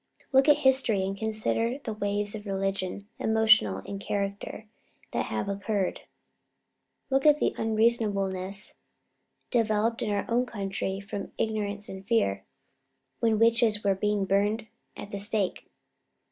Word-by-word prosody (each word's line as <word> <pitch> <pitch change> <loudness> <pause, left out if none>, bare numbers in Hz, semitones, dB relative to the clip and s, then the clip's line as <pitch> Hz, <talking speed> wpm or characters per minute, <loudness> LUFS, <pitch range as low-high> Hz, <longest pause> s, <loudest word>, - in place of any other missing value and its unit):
Look 270 +2 +5
at 295 - +7
history, 260 -8 +3
and 195 +1 -2
consider 220 +3 -1
the 255 -6 -5
waves 205 0 -2
of 210 -1 -7
religion, 195 0 -2
emotional 215 - +4
in 200 - -5
character, 200 +2 -3 0.5
that - - -1
have 110 -1 -2
occurred. 200 -1 -1 1.1
Look 270 0 +3
at 300 0 +6
the - - +1
unreasonableness 210 -3 0 0.7
developed 225 -1 +1
in 220 - -1
our 205 -1 0
own 245 +2 +1
country 195 -2 -3
from 200 0 -6
ignorance 210 -2 -2
and 190 0 -8
fear, 190 - +1 0.8
when 225 -2 +2
witches 225 -1 +3
were 200 -1 +3 0.3
burned 205 +4 +1 0.3
at 205 - -8
the 200 - -4
stake!" 205 -2 -1
210 Hz, 130 wpm, -28 LUFS, 195-225 Hz, 1.1 s, at